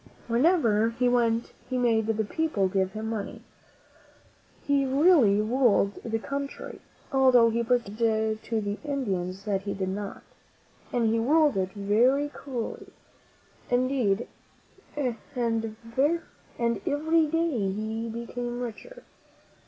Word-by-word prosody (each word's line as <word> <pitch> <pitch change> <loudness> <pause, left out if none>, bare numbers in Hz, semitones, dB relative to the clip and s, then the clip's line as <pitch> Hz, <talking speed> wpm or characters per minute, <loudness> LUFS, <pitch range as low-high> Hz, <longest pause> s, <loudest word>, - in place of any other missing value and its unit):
Wherever 235 - +3
he 245 +2 0
went 235 -1 +1 0.2
he 255 - -1
made 225 -3 +2
the 220 -1 0
people 300 -7 0
give 190 0 0
him 220 +1 -4
money. 220 -3 -5 1.2
He 280 -1 +2
really 270 - +4
ruled 215 -3 +2
the 225 -1 -1
country, 280 +4 -6 0.3
although 255 -4 +5
he 235 +1 0
pretended 220 -2 0
to 225 -1 -1
the 205 0 -3
In 280 -3 -2
dians 185 -1 -3
that 200 -2 0
he 200 0 -4
did 190 -1 -2
not, 200 +1 -5 0.7
and 235 -2 +2
he 230 - +2
ruled 295 +4 +3
it 190 -1 -1
very 240 +8 +2
cruelly 260 -5 -6 0.8
indeed, 245 -4 +1 0.7
and 255 -5 -1 0.2
every 235 +5 -1
day 325 -4 0
he 220 +3 -3
became 240 +1 -5
richer. - - -7
235 Hz, 120 wpm, -27 LUFS, 215-270 Hz, 1.2 s, although